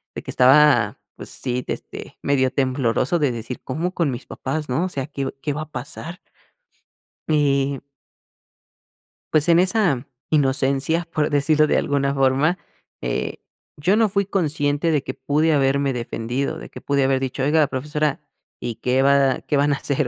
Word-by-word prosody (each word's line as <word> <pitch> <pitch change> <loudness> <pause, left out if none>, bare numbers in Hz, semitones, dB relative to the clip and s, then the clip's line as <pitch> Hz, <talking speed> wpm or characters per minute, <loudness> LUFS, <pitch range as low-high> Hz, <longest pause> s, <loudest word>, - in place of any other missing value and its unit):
de - - -6
que - - -6
estaba, 130 -4 +5 0.2
pues - - -8
sí, 125 -1 -2
este, - - -7
medio 130 -2 +1
tembloroso 130 +3 +1
de 145 -4 +2
decir: 120 +2 -6
"¿Cómo 165 +7 -2
con 165 -6 0
mis 120 - -6
papás?, 150 +2 -4
¿no?, 150 +8 0
o - - -3
sea, 135 -6 -4
¿qué 140 -3 -4
qué 150 - -2
va 150 +2 -3
a 155 - -15
pasar?" 155 +7 -7 1.1
Y 140 -3 +1 1.5
Pues, 155 0 +3
en 170 0 +5
esa 180 - +1 0.2
inocencia, 140 +3 +1
por 150 -1 +1
decirlo 150 +1 +3
de - - +2
alguna 140 -1 0
forma, 135 +6 +2 0.4
eh, - - -2 0.4
yo 180 +7 +2
no 220 -1 +3
fui 200 0 0
consciente 155 -4 0
de 150 -3 +1
que 130 - -5
pude 150 +5 +1
haberme 140 -1 +2
defendido, 125 +5 -3
de - - -10
que - - -11
pude 140 -1 +1
haber 135 0 +2
dicho: 130 0 -3
"Oiga, 150 +1 +3
profesora, 150 +2 -2 0.4
¿y 120 - -4
qué 130 +3 +1
va 140 -2 +3
qué - - -2
van 145 +1 +3
a - - +1
hacer?, 140 0 -1
140 Hz, 165 wpm, -22 LUFS, 130-155 Hz, 1.5 s, estaba